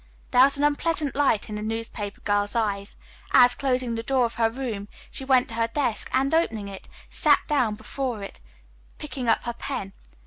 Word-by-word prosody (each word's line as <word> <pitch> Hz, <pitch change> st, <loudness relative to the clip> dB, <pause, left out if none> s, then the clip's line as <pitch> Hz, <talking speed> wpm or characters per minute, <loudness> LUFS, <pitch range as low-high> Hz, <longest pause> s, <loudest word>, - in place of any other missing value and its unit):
There 250 Hz, -, +6 dB
was 275 Hz, +2 st, +5 dB
an 285 Hz, -, -1 dB
unpleasant 295 Hz, -1 st, +1 dB
light 275 Hz, -7 st, +2 dB
in 215 Hz, -, -7 dB
the 210 Hz, -, -4 dB
newspaper 220 Hz, -2 st, -4 dB
girl's 205 Hz, +2 st, 0 dB
eyes, 205 Hz, -3 st, -1 dB, 0.4 s
as, 245 Hz, -1 st, +7 dB
closing 255 Hz, -3 st, 0 dB
the 225 Hz, -, -2 dB
door 255 Hz, +1 st, +2 dB
of 230 Hz, -, -3 dB
her 225 Hz, -1 st, +2 dB
room, 225 Hz, -5 st, -5 dB, 0.2 s
she -, -, -3 dB
went 260 Hz, -2 st, +3 dB
to -, -, -7 dB
her 230 Hz, 0 st, +1 dB
desk 240 Hz, -2 st, -1 dB
and 270 Hz, +3 st, +1 dB
opening 225 Hz, -11 st, +1 dB
it, 195 Hz, -1 st, -10 dB, 0.2 s
sat 295 Hz, -3 st, +4 dB
down 250 Hz, -8 st, +1 dB
before 245 Hz, -2 st, -4 dB
it, 195 Hz, -, -9 dB, 0.6 s
picking 275 Hz, -5 st, -5 dB
up 225 Hz, -, +3 dB
her 240 Hz, -, -3 dB
pen. 235 Hz, -6 st, -5 dB
240 Hz, 195 wpm, -25 LUFS, 215-270 Hz, 0.6 s, as